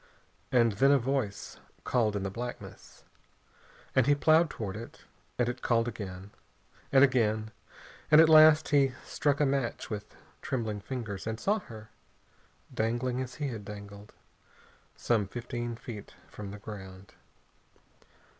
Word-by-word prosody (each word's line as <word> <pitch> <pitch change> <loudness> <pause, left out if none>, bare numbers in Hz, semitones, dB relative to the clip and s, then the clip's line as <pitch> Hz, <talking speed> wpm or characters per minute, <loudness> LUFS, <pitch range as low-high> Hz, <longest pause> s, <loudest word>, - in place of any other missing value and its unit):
And 120 -2 +4
then 135 +7 +3
a 140 - +6
voice 130 -5 -3 0.2
called 110 -4 +1
in 100 - -2
the 95 - -3
blackness, 120 +4 -8 0.9
and 130 -1 +4
he 145 - +5
ploughed 160 +3 +4
toward 100 -5 -5
it, 115 +2 -9 0.4
and 125 - +1
it 120 - -4
called 115 -1 +1
again, 95 -3 -7 0.6
and 135 0 +6
again, 110 -5 +2 0.6
and 155 - +7
at 160 - +8
last 155 0 +7
he 135 -3 +3
struck 145 -1 0
a 150 - +4
match 135 -5 -2
with 105 0 -6 0.3
trembling 110 -5 -3
fingers 110 -4 -5
and 110 0 -3
saw 205 - +1
her, 110 - -12 0.8
dangling 120 +3 -1
as 130 -1 -6
he 145 -2 -3
had 110 -4 -6
dangled, 100 0 -10 0.9
some 110 -5 +1
fifteen 120 +1 -5
feet 110 -3 -9
from 105 -2 -8
the 100 - -8
ground. 95 -2 -10
115 Hz, 140 wpm, -29 LUFS, 105-135 Hz, 0.9 s, at